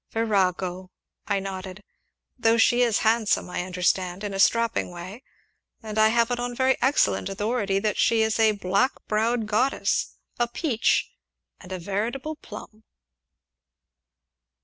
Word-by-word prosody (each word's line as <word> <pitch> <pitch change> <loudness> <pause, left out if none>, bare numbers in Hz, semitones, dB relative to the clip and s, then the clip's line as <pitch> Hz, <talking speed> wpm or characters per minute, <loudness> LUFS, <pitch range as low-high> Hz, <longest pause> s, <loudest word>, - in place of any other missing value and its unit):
"Virago!" 185 -4 -1 0.4
I 200 -2 +1
nodded, 190 0 -7 0.5
"though 230 -2 +2
she 240 +2 +4
is 235 -4 +3
handsome, 220 -3 +2
I - - -2
understand 180 +1 -1
in 205 -1 -4
a 195 - -4
strapping 230 +2 +2
way 180 +6 -9 0.6
and 215 0 -3
I 215 - +6
have 235 +2 +2
it 245 - -1
on 245 0 -3
very 260 +1 +2
excellent 265 -6 +2
authority 205 0 -1
that 210 0 -1
she 225 -1 +3
is 220 0 0
a 220 -1 +4
black 200 +5 +1
browed 225 +2 0
goddess, 225 +6 0 0.2
a 240 - +2
peach, 240 -2 0 0.5
and 180 - -13
a 185 - -3
veritable 225 - -3
plum." 215 -4 -12
215 Hz, 140 wpm, -25 LUFS, 195-235 Hz, 0.6 s, I